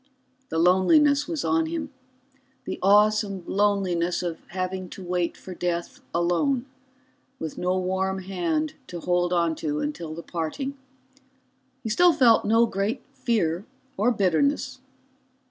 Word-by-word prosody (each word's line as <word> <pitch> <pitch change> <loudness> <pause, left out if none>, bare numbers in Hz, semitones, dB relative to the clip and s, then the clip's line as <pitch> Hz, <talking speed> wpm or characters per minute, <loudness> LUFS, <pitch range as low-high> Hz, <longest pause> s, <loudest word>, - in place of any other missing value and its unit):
The 160 - -2
loneliness 280 - +4
was 330 -4 -3
on 325 -2 +2
him, 320 -2 -4 0.7
the - - -4
awesome 205 -1 +3
loneliness 190 -4 +1
of 170 -2 -3
having 185 0 -4
to 190 - -9
wait 175 -1 -1
for 185 - -9
death 175 -1 -3
alone, 175 - +1 0.7
with 160 - -5
no 180 +1 0
warm 190 +1 -1
hand 170 -5 -1
to 175 - -6
hold 175 +1 +1
on 170 -2 +2
to 150 -1 -2
until 170 - -4
the 170 - -7
parting. 180 - -4 1.1
He 225 - -3
still 350 +10 +5
felt 235 -6 +5
no 225 +2 +4
great 200 0 -2
fear 185 -7 0 0.3
or 215 +5 +2
bitterness. 235 - +1
190 Hz, 130 wpm, -25 LUFS, 175-230 Hz, 1.1 s, still